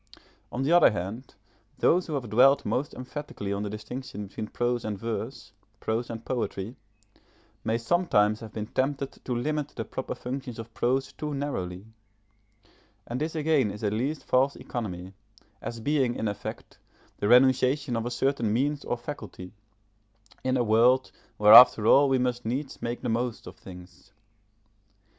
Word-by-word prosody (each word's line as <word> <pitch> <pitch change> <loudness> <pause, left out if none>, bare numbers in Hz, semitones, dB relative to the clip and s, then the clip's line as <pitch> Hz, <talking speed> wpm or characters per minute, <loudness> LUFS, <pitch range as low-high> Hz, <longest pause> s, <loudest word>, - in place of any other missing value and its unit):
On 130 - -2
the 145 - +1
other 175 -1 +7
hand, 105 +6 -5 0.4
those 180 +2 +3
who 155 - -3
have 130 -4 -3
dwelt 135 +5 +5
most 140 +3 -2
emphatically 125 -6 -5
on 100 - -2
the 105 - -3
distinction 105 0 -6
between 110 +2 -6
prose 120 +1 -1
and 105 -2 -3
verse, 115 +2 -5 0.3
prose 115 +2 -2
and 115 -1 -7
poetry, 115 -3 -3 0.9
may 110 +1 0
sometimes 115 - +2
have 110 -2 -9
been 105 -1 -4
tempted 135 +4 -2
to 125 - -2
limit 150 +4 -1
the - - -4
proper - - -5
functions 125 -2 -6
of 115 0 -9
prose 130 +2 0
too 150 -1 -4
narrowly; 95 -10 -4 1.2
and 125 +3 -4
this 160 +1 -2
again 150 -7 +2
is 105 +2 -8
at 105 -1 0
least 135 +7 -2
false 135 +2 +2
economy, 95 -6 -6 0.5
as 115 - -6
being, 130 -1 +1
in 110 - -2
effect, 105 0 -6 0.4
the 100 - 0
renunciation 130 +2 +4
of 115 +1 -2
a - - -1
certain 125 -2 0
means 140 +5 0
or 120 - -2
faculty, 105 -8 -8 0.9
in 130 0 +1
a 125 - +2
world 120 +4 +4 0.3
where 105 0 +7
after 115 -4 +9
all 140 +4 +6
we 135 - +3
must 125 -1 -1
needs 130 +5 -4
make 120 +1 -3
the - - -3
most 120 +1 -2
of - - -10
things. 90 +1 -13
120 Hz, 160 wpm, -27 LUFS, 110-135 Hz, 1.2 s, after